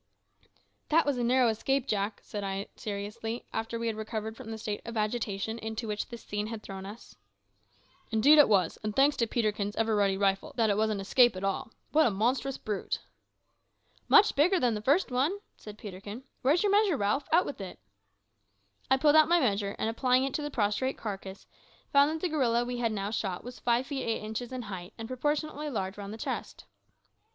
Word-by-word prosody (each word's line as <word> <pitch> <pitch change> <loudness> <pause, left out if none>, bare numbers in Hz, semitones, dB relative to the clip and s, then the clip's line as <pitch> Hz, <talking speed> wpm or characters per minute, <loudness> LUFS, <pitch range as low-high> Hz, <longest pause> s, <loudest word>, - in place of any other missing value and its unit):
"That 325 +2 +4
was 280 -3 0
a - - 0
narrow 250 +1 +4
escape, 265 +4 0
Jack," 205 -3 -2
said 205 -1 -5
I 195 0 -3
seriously, 220 +2 -5
after 225 +1 -2
we 230 - -3
had 225 -1 -1
recovered 220 0 -4
from 235 -2 -10
the 225 - -4
state 210 -1 -4
of 230 -1 -6
agitation 215 0 -2
into 220 +1 -4
which 210 -1 -3
this 235 -2 -9
scene 210 0 -3
had 225 -1 -6
thrown 195 0 -7
us. 215 +4 -11 0.9
"Indeed 270 +8 +6
it 290 - +7
was; 185 -6 +2
and 215 -1 -3
thanks 280 +2 +4
to 230 - +1
Peterkin's 210 -3 -1
ever 225 -1 +1
ready 200 -2 +2
rifle 195 -1 0
that 225 -3 +3
it - - +2
was 220 0 +2
an 210 -2 -1
escape 240 +3 +4
at 185 - -6
all. 195 +2 -1 0.2
What 310 0 +5
a - - +3
monstrous 245 +6 0
brute!" 210 -2 -3 1.1
"Much 430 -1 +6
bigger 350 +6 +4
than 245 -5 +2
the 210 - -3
first 280 - +2
one," 275 +10 +1 0.2
said 210 -1 -11
Peterkin. 205 +4 -8 0.2
"Where 275 +4 +4
is 350 - +1
your 410 - +2
measure, 405 -6 +4
Ralph? 210 +7 0
Out 340 +3 +5
with 275 - -6
it." 190 - -7 1.1
I 265 - +5
pulled 295 +2 +4
out 310 0 +6
my 345 0 +5
measure, 205 -7 0
and - - -1
applying 250 +3 +2
it 270 -1 -2
to - - -1
the 295 - -3
prostrate 225 +1 0
carcass, 195 -2 -6 0.5
found 280 +1 +6
that 315 0 -3
the 360 - 0
gorilla 240 -6 +1
we 245 0 -4
had 230 -2 +1
now 200 -1 -3
shot 190 -5 -3
was 245 0 -9
five 240 +1 +1
feet 275 -1 -4
eight 230 -3 -2
inches 220 +3 -5
in 255 -1 -4
height, 190 -2 -7
and 225 -1 -6
proportionately 295 +3 -2
large 190 -7 -3
round 200 -1 -7
the 220 - -7
chest. - - -5
225 Hz, 210 wpm, -29 LUFS, 205-265 Hz, 1.1 s, it